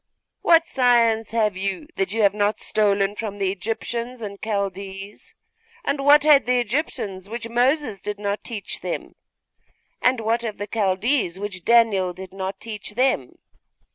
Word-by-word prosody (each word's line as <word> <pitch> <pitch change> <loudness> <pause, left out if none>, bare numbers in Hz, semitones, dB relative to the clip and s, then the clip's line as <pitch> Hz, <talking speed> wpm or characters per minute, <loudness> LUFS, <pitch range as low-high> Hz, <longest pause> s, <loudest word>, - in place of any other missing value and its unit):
What 335 0 +5
science 235 -6 +3
have 215 -3 +1
you 195 +6 -3
that 385 -2 -1
you 225 -1 +1
have 200 -1 +5
not 205 0 +1
stolen 205 -1 +1
from 210 -2 -5
the 195 -2 0
Egyptians 230 +4 -4
and 200 -1 -7
Chaldees? 200 -1 -4 0.5
And 280 -6 -1
what 290 +1 +7
had 295 -4 +6
the 250 0 +3
Egyptians 215 - -3
which 230 0 -4
Moses 245 -1 +1
did 210 +2 -4
not 205 0 -3
teach 215 -4 -5
them? - - -4 0.9
And 255 -1 +3
what 225 +1 0
have 220 -3 -4
the 205 - -4
Chaldees 205 -1 +1
which 195 -3 -5
Daniel 210 -6 +4
did 185 +1 -10
not 190 0 -4
teach 210 -2 -7
them? 250 - +1
215 Hz, 155 wpm, -23 LUFS, 200-240 Hz, 0.9 s, what